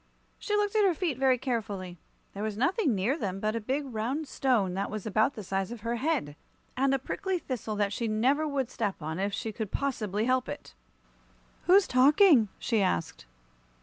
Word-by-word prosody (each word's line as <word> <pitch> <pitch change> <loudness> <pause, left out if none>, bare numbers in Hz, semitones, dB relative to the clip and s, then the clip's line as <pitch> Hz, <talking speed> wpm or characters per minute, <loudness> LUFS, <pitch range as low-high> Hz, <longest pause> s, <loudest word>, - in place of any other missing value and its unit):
She 415 - -1
looked 415 0 0
at 430 - +4
her 375 -4 +3
feet 315 -7 -2
very 260 -2 +4
carefully. 210 - -4 0.3
There 200 - -6
was 215 -1 -3
nothing 280 - +2
near 205 +9 +1
them 195 -4 -3
but 215 +2 -1
a 230 - -2
big 265 +7 -1
round 260 +5 -3
stone 230 -11 +1
that 195 +2 -2
was 215 -2 -5
about 220 +5 +2
the 215 - -6
size 195 +2 -2
of 240 -3 -7
her 235 +2 -2
head, 265 - -1 0.4
and 270 +1 +2
a 270 - +3
prickly 375 +8 -2
thistle 245 -9 -4
that 205 0 0
she 230 +2 -2
never 260 +8 +2
would 270 -3 -2
step 205 -4 -2
on 160 +3 -4
if 200 +1 0
she 220 +2 -3
could 215 -1 -4
possibly 220 -7 -1
help 255 0 +1
it. - - -8 0.9
"Who's 380 +2 +6
talking?" 270 - +5
she 225 -4 0
asked. 85 - -1
235 Hz, 195 wpm, -29 LUFS, 205-275 Hz, 0.9 s, Who's